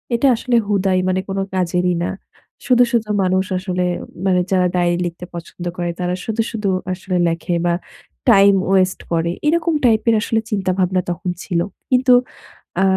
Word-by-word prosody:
এটা 240 +4 +2
আসলে 240 +1 -1
হুদাই 195 -2 +1
মানে 185 0 +1
কোনো 195 0 -1
কাজেরই 180 -1 +1
না। - - -1 0.6
শুধু, 245 0 +5
শুধু 225 -3 0
মানুষ 185 +1 +1
আসলে 180 -1 -2 0.4
মানে 185 -1 +3
যারা 185 -1 +3
ডায়রি 175 -1 +2
লিখতে 175 +1 -6
পছন্দ 175 +1 -8
করে 175 -1 -2
তারা 180 0 -1
শুধু, 225 0 -1
শুধু 215 -3 -3 0.3
আসলে 185 0 -3
লেখে 170 +1 -2
বা 175 - +2 0.6
টাইম 200 -2 +7 0.2
ওয়েস্ট 190 -1 +2
করে। 170 0 +1 0.2
এরকম 335 +1 +2
টাইপের 230 0 +3
আসলে 225 0 0
চিন্তা 195 -3 0
ভাবনা 185 0 +2
তখন 175 +1 -3
ছিল। 170 - -1 0.3
কিন্তু 255 0 +5 0.7
আ - - +4
185 Hz, 160 wpm, -19 LUFS, 180-220 Hz, 0.7 s, টাইম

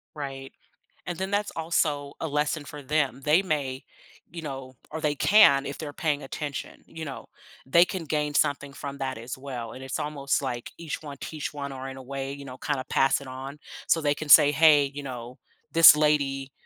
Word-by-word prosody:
Right, 135 -2 -6 0.6
and 175 -2 -4
then 190 +1 -3
that's 205 0 0
also 150 -3 0
a 160 - -2
lesson 150 +1 -1
for 145 0 -9
them. 140 -1 0
They 155 +5 +4
may, 140 -7 -2 0.5
you 170 +2 -7
know 135 -3 -7
or 160 - -5
they 150 -2 0
can 140 -8 +6
if 140 - -6
they're 150 -2 -6
paying 145 -1 -1
attention, 140 +1 -6
you 160 0 -8
know? 140 -3 -7 0.4
They 170 +6 +6
can 180 -1 -5
gain 150 -1 -1
something 145 -1 +1
from 140 0 -7
that 130 -3 -3
as 120 +2 -6
well, 125 -4 -6
and 130 - -10
it's 130 -1 -4
almost 140 -2 -1
like 120 -3 -4
each 165 -2 -5
one 145 -2 -8
teach 155 -2 -5
one 140 -1 -5
or 135 0 -6
in 135 - -8
a 135 - -9
way, 135 +1 -5
you 140 0 -9
know, 130 -2 -9
kinda 140 -3 -2
pass 135 +1 +3
it 140 - -10
on 135 +3 -8 0.3
so 165 - +3
they 145 -2 +1
can 155 +1 -7
say, 145 -1 +8
"Hey," 150 -1 +6
you 145 - -5
know, 125 -2 -8 0.3
"This 165 -2 +9
lady 140 -3 +1
145 Hz, 205 wpm, -26 LUFS, 135-155 Hz, 0.6 s, This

